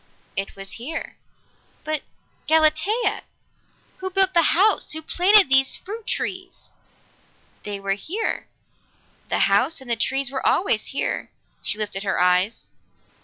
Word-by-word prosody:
"It 195 0 -4
was 195 0 -5
here." 315 +7 -5 0.7
"But 310 -1 -1 0.5
Galatea! 320 +8 +2 0.8
Who 375 0 -4
built 380 0 +4
the 335 -1 +4
house? 420 +4 +3
Who 315 0 -6
planted 380 +5 +5
these 270 0 +4
fruit 430 +3 -9
trees?" 370 -1 -4 0.9
"They 205 -1 -5
were 195 0 -1
here. 365 - -3 0.8
The - - 0
house 250 +11 +2
and 240 -3 -3
trees 270 0 0
were 265 - -3
always 285 - +1
here." 275 - -3 0.3
She - - -3
lifted 205 -2 -3
her 195 -1 -1
eyes. 180 +4 +2
305 Hz, 125 wpm, -23 LUFS, -, 0.9 s, planted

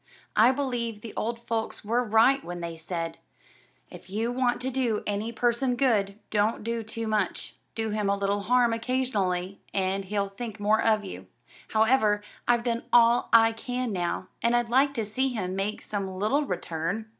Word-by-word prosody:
I 230 +4 +6
believe 245 -5 -2
the 225 - -8
old 235 +1 -3
folks 225 -2 -3
were 235 +4 +1
right 235 +5 +4
when 175 0 -6
they 170 -1 -5
said, 165 0 -4 0.7
'If 180 0 -12
you 220 +4 -1
want 245 -1 +1
to 260 +1 -2
do 245 -4 0
any 210 +2 -2
person 240 +2 +1
good, 210 -7 +1
don't 210 +1 +1
do 230 +1 -2
too 225 +1 -5
much; 215 -1 -1 0.2
do 225 -1 -2
him 210 -1 0
a 200 - +2
little 200 0 0
harm 240 +2 +3
occasionally, 210 -7 -1
and 195 0 0
he'll 200 0 -1
think 220 +1 -7
more 210 +2 +3
of 215 -2 +2
you.' 90 +1 -8 0.4
However, 220 -2 +3 0.2
I've 240 -1 +3
done 235 -1 -1
all 235 0 +5
I 225 0 +7
can 245 0 -3
now, 180 0 -2
and 235 +1 +3
I'd 240 -1 +1
like 275 +3 +3
to 225 -3 -1
see 260 +6 0
him 185 -5 -3
make 195 +2 -2
some 200 -2 -3
little 215 +10 0
return." 175 - -3
220 Hz, 180 wpm, -27 LUFS, 200-240 Hz, 0.7 s, I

